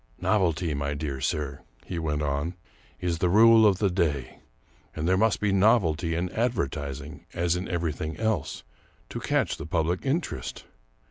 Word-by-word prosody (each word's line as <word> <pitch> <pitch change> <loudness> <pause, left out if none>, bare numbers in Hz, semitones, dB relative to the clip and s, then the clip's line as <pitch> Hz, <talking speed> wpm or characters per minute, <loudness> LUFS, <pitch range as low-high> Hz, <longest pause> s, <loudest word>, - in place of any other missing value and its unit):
" - - -33
Novelty, 85 -5 +1
my 70 0 -2
dear 70 -3 -4
sir," 70 0 -2 0.3
he 85 - -4
went 75 -2 -1
on, 70 +5 -1 0.2
" - - -30
is 85 -2 -1
the 90 - +2
rule 110 +3 +7
of 100 -3 +3
the 100 -1 +1
day; 75 -8 -1 0.6
and 80 +1 -2
there 95 - +4
must 110 0 +2
be 105 -1 +1
novelty 95 -5 +3
in 90 +1 -2
advertising, 75 - -3
as 85 0 +1
in 90 +2 -3
every 85 -2 -1
thing 75 +3 -5
else, 110 -10 -1 0.5
to - - -5
catch - - 0
the - - -7
public 85 +2 0
interest. 135 - -3
85 Hz, 175 wpm, -27 LUFS, 75-100 Hz, 0.6 s, rule